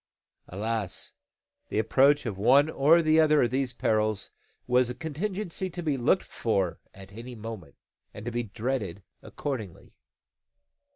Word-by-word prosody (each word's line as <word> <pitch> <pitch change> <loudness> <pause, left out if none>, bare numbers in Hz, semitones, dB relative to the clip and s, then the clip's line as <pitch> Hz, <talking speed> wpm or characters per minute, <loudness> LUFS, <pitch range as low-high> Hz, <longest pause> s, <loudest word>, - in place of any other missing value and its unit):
Alas! 105 0 -3 0.6
the - - -3
approach 135 +7 +4
of 110 -4 -3
one 135 +10 +4
or 160 +5 +5
the 155 0 +4
other 155 -2 +5
of 120 - 0
these 130 -1 0
perils 110 -3 0 0.3
was 125 0 +3
a 125 - -4
contingency 185 +3 -3
to 175 0 -6
be 150 -3 +1
looked 135 +9 +2
for 95 -6 -1
at 95 0 -13
any 120 +3 -8
moment, 110 - -8 0.4
and 105 - -10
to 120 - -3
be 120 +1 -1
dreaded 110 -4 -3 0.2
accordingly. 115 - -6
120 Hz, 140 wpm, -28 LUFS, 110-145 Hz, 0.6 s, or